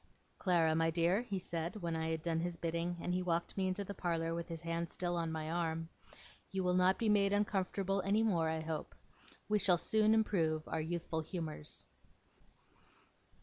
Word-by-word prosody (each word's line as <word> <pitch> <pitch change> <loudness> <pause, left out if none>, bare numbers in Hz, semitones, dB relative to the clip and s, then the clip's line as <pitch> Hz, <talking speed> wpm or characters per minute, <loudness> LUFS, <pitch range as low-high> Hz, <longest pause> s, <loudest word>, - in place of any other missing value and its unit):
'Clara, 170 -4 +3
my 165 0 +3
dear,' 170 +5 +3
he 205 -5 -3
said, 170 -1 -3
when 170 -1 -1
I 160 0 -1
had 160 -1 -2
done 165 -1 0
his 170 0 -2
bidding, 170 +1 -2
and 180 - -1
he 180 - +1
walked 170 -1 -1
me 190 -1 +1
into 185 +2 -1
the 200 - -6
parlour, 165 -3 -1
with 170 +1 -4
his 165 -1 -5
hand 170 0 -2
still 175 -1 -1
on 165 -1 -1
my 160 0 -3
arm; 165 -1 -1 0.6
'you 190 -1 -1
will 180 0 +2
not 185 +1 +4
be 230 - 0
made 200 -2 +4
uncomfortable 195 -1 0
any 200 +4 +2
more, 170 -7 +2
I 160 0 -1
hope. 155 -1 -4 0.5
We 210 0 +2
shall 185 -2 +4
soon 215 +4 +3
improve 165 -8 +1
our 160 - -1
youthful 165 0 -2
humours. 155 - -5
170 Hz, 190 wpm, -35 LUFS, 165-190 Hz, 0.6 s, not